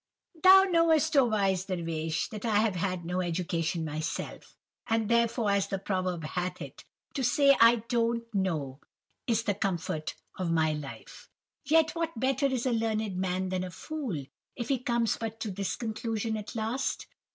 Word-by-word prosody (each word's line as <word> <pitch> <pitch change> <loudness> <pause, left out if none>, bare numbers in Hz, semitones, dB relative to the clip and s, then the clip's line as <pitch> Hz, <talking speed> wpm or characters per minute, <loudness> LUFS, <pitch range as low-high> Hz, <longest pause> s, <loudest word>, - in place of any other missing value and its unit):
"'Thou 380 +1 +9
knowest, 325 -4 +3
oh 275 -2 +6
wise 195 -5 +1
Dervish, 165 -4 -2
that 210 -2 -7
I 225 -3 0
have 215 -1 +2
had 180 -1 -2
no 180 +2 -1
education 170 -2 -1
myself, 155 +1 -5 0.3
and 225 -1 +1
therefore, 235 -1 +2
as 200 -1 +1
the 195 - -2
proverb 185 -3 -2
hath 180 +3 -3
it, - - -9 0.3
"To 270 - -2
say 275 +3 +5
I 230 -1 +6
don't 235 -1 +1
know, 155 -9 -1 0.5
is 230 -2 +1
the 210 -3 +1
comfort 175 -6 -2 0.2
of 180 -2 -1
my 160 -2 +2
life," 150 -2 -9 0.4
yet 315 +2 +4
what 330 -7 -3
better 270 +3 +2
is 260 -2 -1
a 255 - +2
learned 220 -3 -1
man 185 0 -1
than 185 0 -1
a 185 - -4
fool, 220 - -5 0.3
if 240 -1 -5
he 270 -2 +2
comes 235 -3 0
but 225 0 -5
to 215 - -2
this 195 0 -2
conclusion 225 -1 -3
at 210 +1 -6
last? 225 +4 -2
215 Hz, 170 wpm, -29 LUFS, 180-235 Hz, 0.5 s, Thou